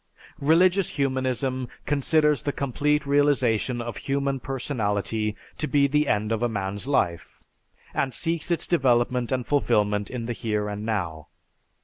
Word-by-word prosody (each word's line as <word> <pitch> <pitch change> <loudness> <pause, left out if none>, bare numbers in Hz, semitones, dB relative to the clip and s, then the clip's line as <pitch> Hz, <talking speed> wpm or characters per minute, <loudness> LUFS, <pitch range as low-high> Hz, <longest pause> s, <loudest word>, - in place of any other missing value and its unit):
"Religious 180 +5 +4
humanism 130 -1 -1 0.2
considers 150 +1 +2
the 145 - -1
complete 145 +2 0
realization 135 -4 +2
of 120 -2 -5
human 140 -1 -1
personality 110 -5 -2 0.2
to 150 - 0
be 145 -2 +3
the 150 +2 +2
end 105 +1 0
of 110 0 0
a 120 - +1
man's 100 +1 -3
life, 85 - -1 0.5
and 135 - 0
seeks 165 +6 -1
its 170 - 0
development 125 -5 +2
and 125 -2 -1
fulfilment 105 -7 +1
in 125 -2 -4
the 120 - -2
here 105 -2 -2
and 105 0 -5
now. 85 -8 -3
130 Hz, 140 wpm, -25 LUFS, 110-145 Hz, 0.5 s, Religious